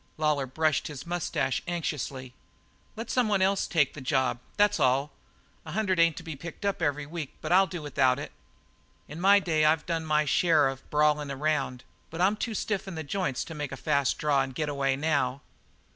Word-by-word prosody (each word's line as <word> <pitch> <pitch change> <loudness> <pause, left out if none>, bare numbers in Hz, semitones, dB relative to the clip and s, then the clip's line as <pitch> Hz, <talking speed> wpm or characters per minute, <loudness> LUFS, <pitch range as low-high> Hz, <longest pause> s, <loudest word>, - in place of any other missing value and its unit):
Lawlor 150 -3 +1
brushed 155 +3 0
his 145 -4 -8
moustache 170 -6 -1
anxiously. 140 -6 -4 0.6
"Let 225 +2 -5
someone 210 -6 +2
else 195 +1 +1
take 155 -6 +2
the 145 - -9
job 130 -2 0 0.2
that's 205 -2 +3
all. 135 +2 +2 0.5
A 155 - -8
hundred 190 -3 0
ain't 165 -2 +4
to 165 - -7
be 160 -2 -6
picked 165 +7 -8
up 200 -3 -1
every 145 -2 0
week, 155 -1 -6
but 155 - -5
I'll 190 +2 +6
do 175 -3 -6
without 130 -3 +2
it. 145 - -6 0.8
In 155 +4 -8
my 200 +2 +6
day 160 -5 +1
I've 155 +1 +3
done 165 -2 -2
my 150 -1 +2
share 155 -1 +3
of 135 0 -6
brawlin' 150 -1 +2
around, 140 -3 -1 0.3
but 165 - -8
I'm 190 +4 +3
too 220 +1 -3
stiff 205 -1 -2
in 190 - -6
the 160 - -4
joints 145 -4 -2
to 165 - -8
make 150 -3 -5
a 135 - -6
fast 140 0 +1
draw 145 -2 +2
and 135 -1 -4
getaway 140 -3 0
now. 140 -3 0
155 Hz, 195 wpm, -28 LUFS, 140-175 Hz, 0.8 s, I'll